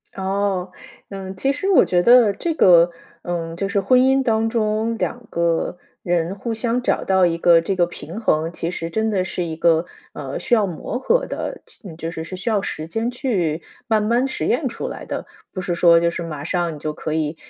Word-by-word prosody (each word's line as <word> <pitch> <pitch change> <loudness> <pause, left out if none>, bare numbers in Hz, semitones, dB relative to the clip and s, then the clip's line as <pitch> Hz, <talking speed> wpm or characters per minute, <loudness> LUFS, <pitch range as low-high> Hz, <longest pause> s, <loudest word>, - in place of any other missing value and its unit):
哦， 190 -1 -1 0.4
嗯， 195 -1 -7
其 270 +8 +1
实 340 +8 -2
我 385 - +6
觉 175 -1 +2
得 235 0 +6
这 330 - -2
个， 175 - +6 0.3
嗯， 165 -1 -4
就 195 +3 -2
是 200 0 +1
婚 250 +6 +4
姻 265 +1 +3
当 225 -2 +1
中 225 0 0
两 240 +2 -3
个 170 +1 0 0.2
人 175 +1 -1
互 230 +4 -5
相 235 +2 -1
找 - - 0
到 190 -2 +3
一 165 -1 -1
个 170 0 +5
这 190 +4 -2
个 175 -2 +3
平 175 +2 -8
衡， 160 -7 +1
其 170 0 -4
实 165 -2 -4
真 220 +4 0
的 190 -3 +1
是 180 0 -3
一 160 -1 -4
个， 165 +1 +3 0.3
呃， 135 -2 -5
需 240 - +2
要 215 -3 +2
磨 185 +5 -4
合 475 - +1
的 - - -5
就 185 -7 -11
就 165 0 -5
是， 160 -1 -5
是 185 - -7
需 185 +6 -3
要 215 -2 +2
时 155 -4 -5
间 225 +8 -2
去 185 - -1 0.3
慢 220 -2 +2
慢 235 +5 +1
实 265 - -3
验 - - +1
出 - - -5
来 - - -7
的。 - - -5 0.2
不 185 - -5
是 175 -1 -2
说 170 -1 +6
就 170 0 +2
是 170 0 -5
马 155 -4 -6
上 175 -1 -1
你 - - -10
就 155 +1 -3
可 155 - -5
以 155 0 -1
185 Hz, 235 characters per minute, -21 LUFS, 170-225 Hz, 0.4 s, 我